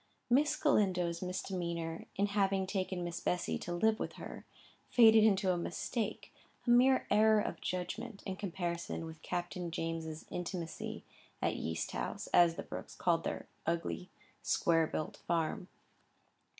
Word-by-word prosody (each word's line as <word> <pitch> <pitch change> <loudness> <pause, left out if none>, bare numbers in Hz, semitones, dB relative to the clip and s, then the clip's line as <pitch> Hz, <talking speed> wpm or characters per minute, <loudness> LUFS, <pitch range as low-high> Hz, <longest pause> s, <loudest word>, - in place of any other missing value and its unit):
Miss 290 +4 +4
Galindo's 180 - +2
misdemeanour 170 -3 -3
in 200 - +2
having 195 -1 +1
taken 185 -2 -2
Miss 170 -1 -3
Bessy 180 -1 -1
to 175 - -5
live 215 +5 +2
with - - -3
her, - - -9 0.4
faded 225 -2 +7
into 195 -3 +4
a 175 - -1
mistake, 210 +6 -3 0.3
a 240 - +3
mere 255 +2 +5
error 215 +1 +6
of - - -3
judgment, 195 +5 -4
in 190 - -3
comparison 175 -4 -3
with 160 -1 -9
Captain 175 0 -3
James's 165 -1 -4
intimacy 175 -2 -4 0.4
at - - 0
Yeast 80 0 -3
House, - - -3
as 170 -1 +6
the 195 - -5
Brookes - - -7
called 170 -2 +2
their - - -3 0.2
ugly 170 +2 -1 0.3
square 165 -1 +3
built 155 - -4
farm. 170 +2 -1
180 Hz, 140 wpm, -34 LUFS, 170-205 Hz, 0.4 s, faded